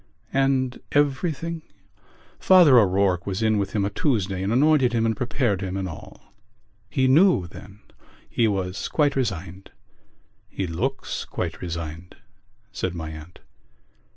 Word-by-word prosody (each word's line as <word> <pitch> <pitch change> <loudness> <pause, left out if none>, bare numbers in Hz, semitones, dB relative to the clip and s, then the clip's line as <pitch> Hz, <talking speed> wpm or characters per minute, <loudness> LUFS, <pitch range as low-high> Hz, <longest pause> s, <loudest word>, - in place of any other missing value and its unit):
"And 135 -2 +1
everything...?" 160 +3 0 0.8
"Father 170 -9 +7
O'Rourke 95 -3 +1
was 95 +3 -2
in 110 -1 +2
with 100 -1 -3
him 100 -2 0
a 100 - -2
Tuesday 100 - -1
and 95 +2 -1
anointed 135 -1 +3
him 115 -1 +1
and 115 -1 +1
prepared 120 -3 -1
him 95 -1 -3
and 95 -1 -3
all." 80 - -12 0.6
"He 130 -1 +1
knew 155 - +4
then?" 100 +3 -13 0.5
"He 115 - +1
was 95 -2 -2
quite 145 -2 +1
resigned." 95 -7 -4 0.8
"He 95 - -3
looks 120 +12 -3
quite - - -5
resigned," 85 0 -6 0.6
said 90 -1 -3
my 80 -2 -5
aunt. 80 +3 -12
105 Hz, 135 wpm, -24 LUFS, 95-135 Hz, 0.8 s, Father